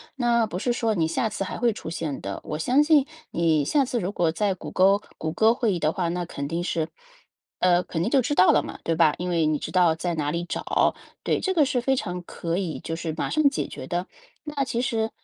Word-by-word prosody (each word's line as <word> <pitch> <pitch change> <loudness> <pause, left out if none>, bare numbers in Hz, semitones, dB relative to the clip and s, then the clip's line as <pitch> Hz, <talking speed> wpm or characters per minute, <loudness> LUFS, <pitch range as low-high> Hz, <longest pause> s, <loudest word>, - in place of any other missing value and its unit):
那 235 -3 +2
不 180 - -5
是 240 +6 0
说 225 -2 0
你 165 -4 +1
下 190 +7 0
次 210 -2 -3
还 190 - -5
会 240 -1 +3
出 205 - -7
现 160 -4 -4
的。 100 0 -5
我 150 - -4
相 255 - +3
信 300 -3 +4 0.3
你 160 -3 +2
下 280 - +2
次 245 -1 -2
如 185 0 -2
果 170 -5 +1
在 195 +4 0
谷 - - -8
歌 195 +2 +4 0.2
谷 160 - -2
歌 220 +7 +4
会 235 -4 0
议 175 - -2
的 155 - +1
话， 175 0 -1
那 175 +1 -2
肯 140 -4 -5
定 170 +4 -2
是 165 -2 -1 0.7
呃， 180 -1 +4
肯 165 - -3
定 210 - 0
就 270 - +4
知 250 +4 -1
道 185 - +6
了 - - +4
嘛， - - -7
对 165 - 0
吧？ 160 -2 +4
因 180 +1 -2
为 165 -2 +2
你 155 -1 +1
知 - - -5
道 180 -3 +4
在 175 +1 -2
哪 150 -2 -1
里 170 +2 -2
找。 - - 0 0.3
对， - - +1
这 380 - 0
个 310 -4 +5
是 260 -3 0
非 265 +2 +2
常 180 -7 -3
可 170 -1 -4
以 180 -5 -3
就 165 - -4
是 165 -1 -4
马 - - -1
上 310 - +1
解 275 - -3
决 - - -8
的。 175 +1 -2 0.4
那 295 -2 -2
其 240 -3 -2
实， 225 -3 0
180 Hz, 275 characters per minute, -25 LUFS, 165-235 Hz, 0.7 s, 道